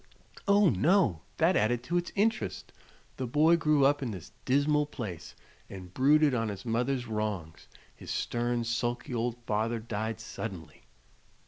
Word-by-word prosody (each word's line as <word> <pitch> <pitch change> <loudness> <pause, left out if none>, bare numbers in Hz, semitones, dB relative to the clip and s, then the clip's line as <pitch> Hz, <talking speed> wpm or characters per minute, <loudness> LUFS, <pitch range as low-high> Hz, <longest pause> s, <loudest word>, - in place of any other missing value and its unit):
"Oh, 200 -3 +5
no; 115 - +2 0.2
that 170 +3 +3
added 120 0 +1
to 175 +7 -1
its 175 0 -2
interest. 220 +2 -1 0.4
The 130 - -3
boy 155 +7 +4
grew 150 -4 +3
up 145 +1 +3
in 130 - -2
this 95 -7 -8
dismal 145 +2 +2
place 110 - -7 0.3
and 90 -2 -10
brooded 145 +3 +4
on 115 -3 0
his 100 +1 -7
mother's 125 +2 0
wrongs. 105 -8 -4 0.3
His - - -11
stern, 120 0 -1
sulky 120 +1 -2
old 120 0 -1
father 110 +2 0
died 110 0 -4
suddenly. 95 -9 -8
120 Hz, 145 wpm, -29 LUFS, 110-150 Hz, 0.4 s, Oh